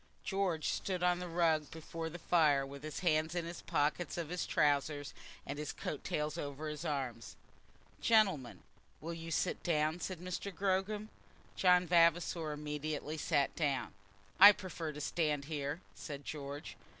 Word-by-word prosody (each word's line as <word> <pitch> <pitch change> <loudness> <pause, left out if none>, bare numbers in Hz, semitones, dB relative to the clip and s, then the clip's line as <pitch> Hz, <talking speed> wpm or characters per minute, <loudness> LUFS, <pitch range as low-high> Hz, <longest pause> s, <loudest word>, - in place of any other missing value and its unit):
George 190 -6 0
stood 185 -2 -2
on 180 0 +3
the 180 - -4
rug 165 -3 +2
before 160 0 -6
the 170 - -7
fire, 155 -5 +3
with 140 0 -9
his 155 0 -5
hands 160 -1 +2
in 175 -1 -1
the 170 - -5
pockets 165 +1 0
of 165 -3 -3
his 180 0 -2
trousers, 145 -1 +1 0.3
and 140 +1 -5
his 150 -1 -3
coat 150 - -5
tails 150 +2 -2
over 145 +1 -4
his 150 +1 -5
arms. 135 -7 -3 0.7
"Gentlemen, 190 - +3 0.4
will 165 +2 -5
you 165 0 -7
sit 165 +3 0
down?" 155 0 +1
said 185 0 -4
Mr. 180 +3 -4
Gogram. 195 +3 -1 0.5
John 180 -1 +5
Vavasor 170 -1 +3
immediately 150 0 -4
sat 145 -3 +1
down. 140 -8 -1 0.5
"I 200 +2 +12
prefer 175 -5 -5
to 150 0 -7
stand 150 -2 0
here," 145 +1 -3
said 145 -2 -7
George. 145 -1 -6
Mr. - - -26
160 Hz, 160 wpm, -35 LUFS, 150-175 Hz, 0.7 s, I